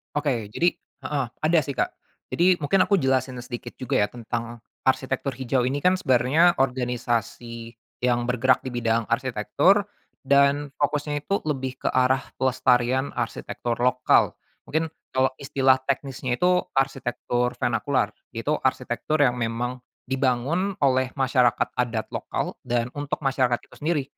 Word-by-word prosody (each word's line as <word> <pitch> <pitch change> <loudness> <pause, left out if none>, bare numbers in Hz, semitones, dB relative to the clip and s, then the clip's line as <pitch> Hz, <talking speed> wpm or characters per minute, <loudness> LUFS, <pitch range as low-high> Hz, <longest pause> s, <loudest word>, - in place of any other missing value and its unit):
Oke. 135 -8 0
Jadi 175 +1 +3 0.3
heeh, 140 -3 -1 0.2
ada 160 +2 +4
sih, 140 - -5
Kak. - - 0 0.4
Jadi, 180 +1 +3
mungkin 160 +6 +3
aku 200 -2 +2
jelasin 130 -2 0
sedikit 120 0 -7
juga 130 - -2
ya - - +1
tentang 120 0 -5 0.2
arsitektur 130 +1 0
hijau 130 0 0
ini 140 +2 -1
kan 180 +5 +3
sebenarnya 150 +2 +3
organisasi 120 -2 -2 0.3
yang 120 -1 +1
bergerak 125 +1 +3
di 130 - -4
bidang 115 -2 0
arsitektur, 130 - +2 0.4
dan 140 +1 +4
fokusnya 145 0 -1
itu 200 +5 0
lebih 130 -3 -3
ke - - +4
arah 130 +1 +3 0.2
pelestarian 130 0 +1
arsitektur 120 0 -3
lokal. 125 +1 +3 0.3
Mungkin 160 0 -1 0.2
kalau 130 0 +3
istilah 135 -1 +3
teknisnya 135 -2 -1
itu, 180 +5 +2
arsitektur 125 -2 0
vernakular. - - 0 0.2
Itu - - -1
arsitektur 155 -1 0
yang 125 -2 +2
memang 120 +2 -2 0.3
dibangun 135 +9 0
oleh 130 -1 +2
masyarakat 130 -3 +2
adat 115 -3 -1
lokal, - - -4
dan 120 0 0
untuk 145 +1 -4
masyarakat 130 -3 +1
itu - - -18
sendiri, 150 -1 0
130 Hz, 135 wpm, -25 LUFS, 120-145 Hz, 0.4 s, ada